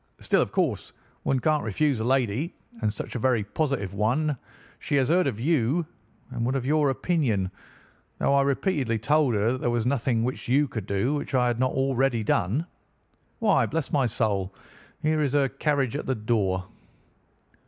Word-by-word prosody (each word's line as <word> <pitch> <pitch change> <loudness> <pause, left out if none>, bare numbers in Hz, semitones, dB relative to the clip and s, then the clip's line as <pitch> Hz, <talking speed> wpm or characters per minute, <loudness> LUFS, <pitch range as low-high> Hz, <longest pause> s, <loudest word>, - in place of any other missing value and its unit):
Still, - - +2
of - - -1
course, - - -1 0.3
one 135 - +1
can't 155 +2 +1
refuse 130 +4 0
a - - -1
lady, 130 - 0 0.3
and 105 - +1
such - - -7
a 125 - -3
very 120 -3 +2
positive 105 - -2
one, 120 +10 +1
too. 145 - -1 0.4
She - - -2
has 135 -1 +2
heard 180 +2 +3
of 105 - -3
you, 150 +3 +1 0.5
and - - -3
would 130 +3 0
have 130 -2 -1
your 150 0 +3
opinion, 130 - 0 0.7
though - - +2
I 140 - +5
repeatedly 140 - 0
told 140 +2 +2
her 105 +3 +2
that 130 - -3
there - - +1
was 120 -1 0
nothing 125 -3 +1
which 125 +2 -3
you 140 +4 +3
could 110 -6 -6
do 100 +8 0
which 145 -2 -3
I 125 -1 +3
had 120 -1 0
not 130 0 +1
already 135 -3 +1
done. 110 - +1 0.7
Why, 215 -4 +3
bless 160 -2 -3
my 135 -4 +2
soul! 100 -4 -1 0.5
here 155 0 +2
is 140 -2 0
her 140 -2 +3
carriage 140 -3 0
at - - -4
the 130 - +1
door." 105 -5 0
130 Hz, 185 wpm, -26 LUFS, 110-145 Hz, 0.7 s, I